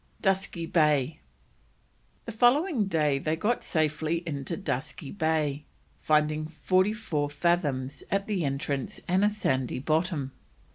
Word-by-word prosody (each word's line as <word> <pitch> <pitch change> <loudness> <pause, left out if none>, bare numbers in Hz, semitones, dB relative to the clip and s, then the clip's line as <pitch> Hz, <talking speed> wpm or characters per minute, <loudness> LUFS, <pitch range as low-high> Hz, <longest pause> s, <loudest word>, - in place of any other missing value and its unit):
DUSKY 190 -3 0
BAY. 150 -3 +2 1.1
The 230 - -5
following 245 - +3
day 150 -6 +1
they 155 +3 0
got 215 +9 0
safely 155 +1 0
into 145 +1 -3
Dusky 145 -5 -4
Bay, 155 -5 0 0.4
finding 155 0 +2
forty 185 +5 +2
four 170 -10 -2
fathoms 145 -4 0
at 195 0 0
the 200 -5 -1
entrance 140 -1 -2
and 185 +3 +2
a 210 - +5
sandy 130 -12 -1
bottom. 155 0 0
160 Hz, 125 wpm, -28 LUFS, 145-190 Hz, 1.1 s, a